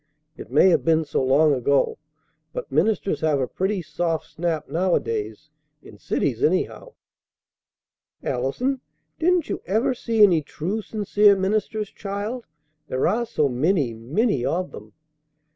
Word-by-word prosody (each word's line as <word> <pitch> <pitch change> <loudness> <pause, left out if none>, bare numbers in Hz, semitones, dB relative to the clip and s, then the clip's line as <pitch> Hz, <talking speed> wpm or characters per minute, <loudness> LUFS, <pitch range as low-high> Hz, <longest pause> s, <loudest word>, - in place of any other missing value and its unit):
It - - -10
may 150 +7 +6
have 175 - +3
been 160 -1 +2
so 140 - -1
long 145 +3 +4
ago; 135 +1 +1 0.5
but - - -6
ministers 170 +1 +1
have 155 -3 +2
a 130 - +1
pretty 190 - -2
soft 165 0 -2
snap 160 -1 -3
nowadays, 190 - -1 0.3
in - - -14
cities - - -1
anyhow." - - 0 1.3
"Allison! 190 - -1 0.4
Didn't 355 +1 +2
you - - -4
ever 220 +7 +1
see 230 -3 +2
any 175 -6 +5
true, 180 +9 -4
sincere 205 -1 +3
ministers, 210 +2 -1
child? 210 +4 -5 0.4
There 130 -1 0
are 235 +2 0
so 150 - +1
many, 140 0 +1
many 135 - 0
of 170 +8 -1
them!" 105 0 -11
180 Hz, 135 wpm, -23 LUFS, 145-215 Hz, 1.3 s, may